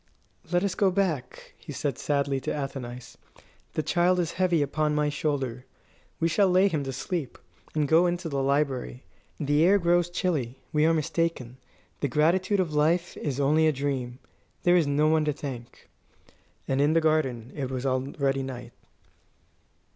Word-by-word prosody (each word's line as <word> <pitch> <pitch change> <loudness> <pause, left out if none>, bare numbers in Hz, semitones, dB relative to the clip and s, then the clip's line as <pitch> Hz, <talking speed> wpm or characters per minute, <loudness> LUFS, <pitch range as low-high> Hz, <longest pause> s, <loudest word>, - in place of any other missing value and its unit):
"Let 175 +1 +2
us 200 -2 0
go 195 0 +3
back," 175 -10 -2
he - - -9
said - - -3
sadly 140 -2 0
to - - -3
Athenais; 125 -4 -6 0.6
"the 155 - -1
child 175 +4 +2
is 170 -2 0
heavy 175 -4 +2
upon 150 +1 0
my 150 0 +1
shoulder. 135 -5 -2 0.6
We 165 - +2
will 195 -2 +5
lay 185 +2 +4
him 155 -5 -1
to 135 - -3
sleep, 140 +1 -4 0.4
and 150 -2 +1
go 165 +4 +5
into 175 0 -2
the 140 -3 -1
library. 135 -2 -1 0.4
The 145 0 +2
air 195 +4 +5
grows 175 -1 +2
chilly. 155 -9 -2 0.2
We 150 +1 +3
were 165 - +4
mistaken. 155 -5 -2 0.4
The 140 - 0
gratitude 180 - +2
of 170 -5 0
life 165 +4 +1
is 140 -3 -3
only 155 +3 +3
a - - +4
dream. 130 -3 -3 0.5
There 175 0 +5
is 170 -4 +3
no 145 +2 +2
one 155 0 +3
to 150 - +1
thank." 130 -5 -8 0.8
And 135 +1 +1
in 145 +2 +3
the 165 - +3
garden 135 -7 0
it 135 -3 -3
was 130 0 -4
already 135 +1 0
night. 130 -2 -7
150 Hz, 170 wpm, -27 LUFS, 135-170 Hz, 0.8 s, will